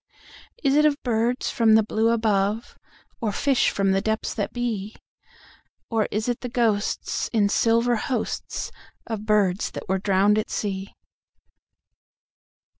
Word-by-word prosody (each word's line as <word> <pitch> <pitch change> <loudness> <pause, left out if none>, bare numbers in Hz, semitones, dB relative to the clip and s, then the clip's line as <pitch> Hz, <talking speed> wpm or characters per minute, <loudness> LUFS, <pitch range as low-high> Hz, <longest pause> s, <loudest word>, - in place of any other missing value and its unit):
Is 275 -2 +3
it 300 - +5
of 300 -2 +3
birds 240 +1 0
from 225 -2 +4
the 220 - +5
blue 220 +1 +1
above, 220 -1 0 0.5
Or 220 -3 0
fish 275 +4 +2
from 195 -1 +1
the 195 0 +2
depths 220 +1 -1
that 205 - -3
be? 225 -4 -3 1.0
Or 220 -2 +1
is 215 +2 -2
it 245 -1 -1
the 250 - -4
ghostsIn 220 -2 0
silver 230 +1 +2
hostsOf 235 +1 -3 0.5
birds 205 -3 +1
that - - -8
were 190 0 0
drowned 200 +2 +3
at 215 - -3
sea? 195 -1 -4
220 Hz, 130 wpm, -24 LUFS, 205-235 Hz, 1.0 s, it